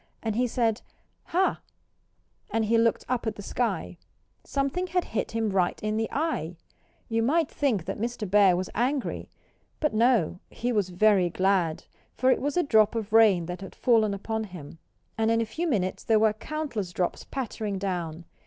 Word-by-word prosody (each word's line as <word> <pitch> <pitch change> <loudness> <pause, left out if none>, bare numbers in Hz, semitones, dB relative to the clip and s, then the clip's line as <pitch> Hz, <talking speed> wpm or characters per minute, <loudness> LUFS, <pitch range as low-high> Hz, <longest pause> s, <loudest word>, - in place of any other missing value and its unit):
And 220 -2 -1
he 250 +2 +2
said, 225 -2 0 0.4
"Hah!" 375 +3 +1 0.9
And 225 -1 0
he 225 +2 +2
looked 230 -1 +2
up 245 -2 -1
at 215 - -2
the 205 - -9
sky. 195 -7 -2 0.4
Something 280 +7 -1
had 360 0 0
hit 225 - -2
him 225 -2 0
right 185 -2 +1
in 215 0 0
the 225 0 -1
eye. 270 - -2 0.5
You 225 0 0
might 305 +7 +2
think 230 - 0
that - - -4
Mr. 230 -1 -3
Bear 195 -1 +5
was 185 0 -3
angry. 260 +4 -1 0.5
But 300 -5 0
no! 220 -6 +2
He 245 +1 -3
was 205 -5 +1
very 185 -1 +3
glad. 185 -3 +1 0.3
For 260 +1 +3
it - - +1
was 290 +4 -1
a 355 - +4
drop 220 -4 +4
of 220 -1 -4
rain 210 -6 +5
that 180 +2 -6
had 195 - -9
fallen 220 -4 +3
upon 220 +2 -3
him. 165 -5 -11 0.4
And 220 0 +2
in 230 0 +3
a 230 - +1
few 320 +11 -3
minutes 190 - -1
there 225 - +3
were 215 0 +4
countless 230 - -4
drops 180 0 -2
pattering 220 -6 -4
down. 175 -4 -3
220 Hz, 180 wpm, -27 LUFS, 190-245 Hz, 0.9 s, Bear